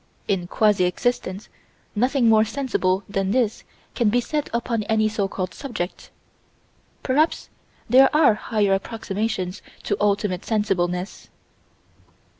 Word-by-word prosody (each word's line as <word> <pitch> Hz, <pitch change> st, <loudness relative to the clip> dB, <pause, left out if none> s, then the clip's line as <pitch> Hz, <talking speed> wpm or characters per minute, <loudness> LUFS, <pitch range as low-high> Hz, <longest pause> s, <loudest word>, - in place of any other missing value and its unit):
In 195 Hz, -3 st, +1 dB
a -, -, -11 dB
quasi 205 Hz, -1 st, +2 dB
existence, 190 Hz, 0 st, -2 dB, 0.5 s
nothing 250 Hz, +2 st, +2 dB
more 220 Hz, -1 st, +6 dB
sensible 220 Hz, -6 st, -1 dB
than 195 Hz, -1 st, -1 dB
this 225 Hz, -1 st, 0 dB, 0.3 s
can 235 Hz, -4 st, +2 dB
be 245 Hz, +4 st, +2 dB
said 295 Hz, +4 st, -2 dB
upon 235 Hz, -1 st, -1 dB
any 220 Hz, 0 st, +2 dB
so 210 Hz, -2 st, -1 dB
called 185 Hz, -1 st, -4 dB
subject 235 Hz, -10 st, -6 dB, 0.9 s
perhaps 300 Hz, +5 st, +1 dB, 0.4 s
there 260 Hz, +3 st, +6 dB
are 305 Hz, -6 st, +5 dB
higher 210 Hz, -2 st, 0 dB
approximations 195 Hz, -2 st, -3 dB, 0.2 s
to 205 Hz, -, 0 dB
ultimate 200 Hz, -3 st, 0 dB
sensibleness. 185 Hz, -4 st, -1 dB
215 Hz, 120 wpm, -23 LUFS, 195-235 Hz, 0.9 s, more